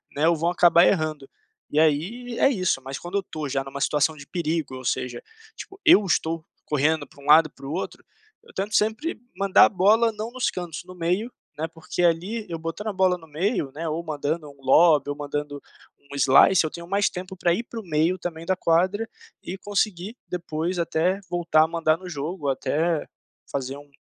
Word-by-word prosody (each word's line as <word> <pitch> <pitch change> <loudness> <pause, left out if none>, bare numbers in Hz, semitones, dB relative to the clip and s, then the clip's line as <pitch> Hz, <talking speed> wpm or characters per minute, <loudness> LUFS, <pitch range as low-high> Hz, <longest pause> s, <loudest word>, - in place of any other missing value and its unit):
né, 155 +3 +2
ou 170 - +4
vão 165 +2 0
acabar 175 0 +5
errando 155 -6 0 0.5
e 150 - +3
aí 195 +11 0
é 275 - +5
isso, 185 - 0
mas 135 +1 -6
quando 175 +3 -7
eu 200 - +2
estou 155 -5 -6
já 135 0 -1
em 135 - -8
uma 140 +1 -7
situação 150 +2 +1
de 140 -1 -12
perigo 160 -5 -2
ou 130 - -8
seja, 125 -1 -2 0.3
tipo 390 - -10
eu 260 - +7
estou 165 -2 0 0.2
correndo 150 +1 +1
para 140 - -18
um - - -14
lado 155 +2 +7
e - - -19
para 135 - -13
o 140 - -5
outro, 180 - -5 0.4
eu - - -18
tento 200 +3 -3
sempre 220 +10 0 0.2
mandar 195 -1 +6
a - - +2
bola 220 +4 +4
não 215 +2 -5
nos 255 0 0
cantos, 175 -3 -6
no 185 - -11
meio, 180 +8 -1 0.3
né, 160 +2 -2
porque 165 +2 -5
ali, 180 +7 +1
eu 165 - -3
botando 165 +6 -5
a 210 - -1
bola 185 -1 +2
no 160 -2 -16
meio, 155 - -1
né, 165 +2 -4
ou 160 +2 -2
mandando 155 0 -3
um 140 -1 -17
lobby 145 +1 +5
ou 145 - -2
mandando 145 0 -4 0.4
um 140 0 -12
slice, 140 +7 +6
eu - - -1
tenho 170 0 -9
mais 200 +2 +2
tempo 185 +1 -7
para 175 -1 +2
ir 215 +7 -2
para 235 -1 -8
o 220 - -8
meio 165 +2 +1
também 165 -2 -6
da 185 +2 +1
quadra, 185 +6 +1 0.4
e 185 - -6
conseguir 205 +1 -2
depois 175 0 -3
até 170 +3 +1
voltar 170 -3 +3
a - - +1
mandar 160 -1 +1
no 185 +1 -11
jogo, 150 +1 -4
até 155 +4 0 0.5
fazer 135 0 -3
um 145 0 -14
165 Hz, 210 wpm, -24 LUFS, 150-185 Hz, 0.5 s, eu